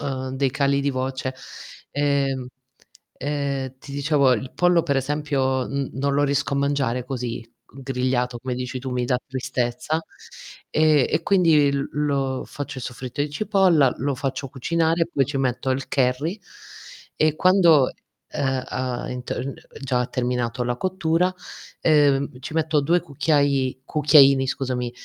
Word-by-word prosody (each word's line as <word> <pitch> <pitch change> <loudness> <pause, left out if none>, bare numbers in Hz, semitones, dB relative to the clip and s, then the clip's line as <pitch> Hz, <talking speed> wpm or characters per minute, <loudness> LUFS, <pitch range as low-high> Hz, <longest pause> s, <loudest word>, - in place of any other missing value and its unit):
uhm, 130 -2 -3
dei 135 0 0
cali 140 0 +1
di 140 0 0
voce. 130 0 -3 0.6
Ehm, 140 -3 0 0.7
ehm, 140 -2 -2
ti 140 - -11
dicevo 140 -2 +3
il 125 +2 -2
pollo 175 -1 +3
per 140 -4 0
esempio, 135 -2 0
n 140 -1 -3
non 140 +1 -1
lo 145 - +3
riesco 140 0 0
a - - 0
mangiare 140 -3 0
così 125 -3 -4
g 120 +3 -16
grigliato, 125 -2 -1
come 125 +1 -4
dici 125 +1 -4
tu 130 +1 -5
mi 125 -1 -1
dà 125 0 +1
tristezza; 130 +3 -2 0.7
e 155 -4 +4
e 155 - 0
quindi 165 -7 +4
l 140 0 -1
lo 140 -3 -1
faccio 140 -2 -6
soffritto 125 +2 -6
i 145 +1 0
cipolla, 185 - +3
lo 140 +1 -1
faccio 135 +1 -3
cucinare, 165 +5 0
poi 135 - +2
ci 140 +1 -4
metto 130 0 -1
il 130 +1 -1
curry 140 +9 0 0.8
e 155 -1 +3
quando, 170 -7 +5 0.4
ehm, 135 -2 -1
ha 125 -1 -3
in 125 0 -5
t - - -4
uhm, 135 +2 -3 0.3
già 130 -2 0
ha 125 - 0
terminato 125 -1 -2
la 120 0 -1
cottura, 180 +2 0 0.5
ehm, 140 -4 +3
ci 140 - -7
metto 155 -2 +2
2 170 +5 +2
cucchiai 140 -4 0
cucchiaini, 140 -2 +5
scusami, 125 -2 -2
135 Hz, 155 wpm, -23 LUFS, 130-150 Hz, 0.8 s, quando